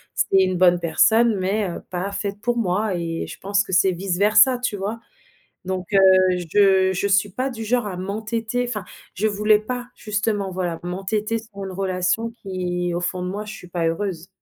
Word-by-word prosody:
c'est 195 Hz, -, +3 dB
une 185 Hz, -1 st, 0 dB
bonne 175 Hz, -1 st, +5 dB
personne 220 Hz, +7 st, +3 dB
mais, 195 Hz, +2 st, 0 dB
heu, 170 Hz, -, -6 dB
pas 185 Hz, +2 st, -3 dB
faite 200 Hz, 0 st, -4 dB
pour 240 Hz, +1 st, 0 dB
moi 205 Hz, -1 st, 0 dB
et 165 Hz, -1 st, -3 dB
je -, -, -10 dB
pense 200 Hz, +1 st, +1 dB
que -, -, -10 dB
c'est 190 Hz, +1 st, +4 dB
vice 180 Hz, 0 st, -3 dB
versa 215 Hz, +5 st, +5 dB
tu 245 Hz, -3 st, -2 dB
vois? 205 Hz, +3 st, -4 dB, 0.7 s
Donc, 185 Hz, 0 st, -3 dB
heu, 195 Hz, -, +6 dB, 0.5 s
je 190 Hz, -2 st, +5 dB
je 195 Hz, +3 st, 0 dB
suis 200 Hz, +1 st, +3 dB
pas 255 Hz, +7 st, -2 dB
du 225 Hz, -3 st, -6 dB
genre 235 Hz, 0 st, 0 dB
à 185 Hz, -, -5 dB
m'entêter 220 Hz, +5 st, -2 dB
enfin, 210 Hz, -5 st, -4 dB, 0.3 s
je 210 Hz, +4 st, 0 dB
voulais 210 Hz, 0 st, +3 dB
pas 245 Hz, +3 st, -5 dB
justement, 210 Hz, -2 st, -2 dB
voilà, 175 Hz, -2 st, -2 dB
m'entêter 205 Hz, +5 st, -2 dB
sur 210 Hz, -3 st, -10 dB
une 190 Hz, -, -5 dB
relation 185 Hz, +4 st, -1 dB
qui 180 Hz, -2 st, -2 dB
au 175 Hz, -, -1 dB
fond 180 Hz, +1 st, -2 dB
de 180 Hz, -, -3 dB
moi 205 Hz, +2 st, -4 dB
je 210 Hz, -, -7 dB
suis 180 Hz, -, -11 dB
pas 170 Hz, -1 st, -1 dB
heureuse. 170 Hz, 0 st, -3 dB
200 Hz, 200 wpm, -22 LUFS, 185-215 Hz, 0.7 s, heu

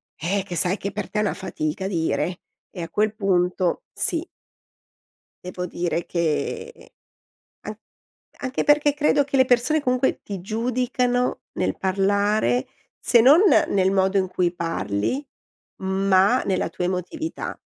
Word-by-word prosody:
eh, 190 Hz, +5 st, -1 dB
che 180 Hz, -, -6 dB
sai 180 Hz, +5 st, +2 dB
che 200 Hz, -, -4 dB
per 200 Hz, 0 st, -5 dB
te 210 Hz, -, -2 dB
è -, -, +3 dB
una 210 Hz, -, 0 dB
fatica 190 Hz, -1 st, -4 dB
dire, 175 Hz, 0 st, -1 dB, 0.3 s
e 180 Hz, -, -7 dB
a 165 Hz, -, -5 dB
quel 215 Hz, +3 st, 0 dB
punto 185 Hz, -, 0 dB
sì. 335 Hz, 0 st, -1 dB, 1.2 s
Devo 180 Hz, 0 st, -5 dB
dire 175 Hz, -1 st, -2 dB
che 170 Hz, -, -3 dB, 0.7 s
an -, -, -7 dB, 0.6 s
anche 260 Hz, -1 st, -2 dB
perché 295 Hz, 0 st, +4 dB
credo 295 Hz, 0 st, +2 dB
che 280 Hz, -, -3 dB
le 260 Hz, -, +7 dB
persone 250 Hz, +5 st, +2 dB
comunque 255 Hz, -1 st, 0 dB
ti 200 Hz, -2 st, -6 dB
giudicano 245 Hz, +4 st, -1 dB, 0.2 s
nel -, -, -1 dB
parlare, 200 Hz, +6 st, +1 dB, 0.3 s
se 240 Hz, -, +4 dB
non 285 Hz, +9 st, +7 dB, 0.3 s
nel 190 Hz, -1 st, +2 dB
modo 190 Hz, 0 st, +2 dB
in 190 Hz, -1 st, +1 dB
cui 180 Hz, -1 st, 0 dB
parli, 165 Hz, -, -2 dB, 0.8 s
ma 195 Hz, +6 st, +4 dB
nella 190 Hz, -, -1 dB
tua 180 Hz, -, -3 dB
emotività. 190 Hz, -, -4 dB
200 Hz, 140 wpm, -23 LUFS, 180-250 Hz, 1.2 s, le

